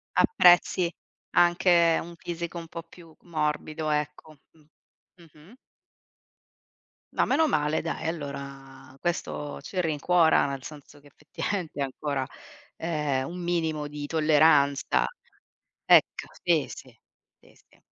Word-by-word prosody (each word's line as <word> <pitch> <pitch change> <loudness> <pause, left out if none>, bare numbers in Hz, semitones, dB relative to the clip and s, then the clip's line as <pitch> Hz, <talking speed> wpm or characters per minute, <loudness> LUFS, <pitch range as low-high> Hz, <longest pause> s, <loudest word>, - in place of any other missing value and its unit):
Apprezzi 175 - +4 0.5
anche 175 -1 +4
un 170 0 -10
fisico 170 0 -6
un 165 -1 -7
po' 165 - -7
più 165 -1 -17
morbido, 155 -1 -2
ecco. 150 0 -3
Mh. 160 - -25 0.6
Mh-mh. 165 - -18 1.6
Ma - - +2
meno 315 +3 +3
male 150 - +1
dai, 165 - -4
allora 140 -3 -7
questo 155 -4 -3
ci 185 - -5
rincuora, 165 0 +3
nel 135 -1 -5
senso 145 -1 -12
che 145 - -19
effettivamente 150 +2 -5
ancora, 135 0 -2 0.5
ehm, 150 -5 -1
un 180 +1 -7
minimo 160 -4 -1
di 145 0 -6
tolleranza. 150 - +3 0.8
Ecco, - - +4 0.2
sì, - - +2
sì. - - -12 0.4
Si - - -22
si. - - -27
155 Hz, 115 wpm, -27 LUFS, 145-170 Hz, 1.6 s, Apprezzi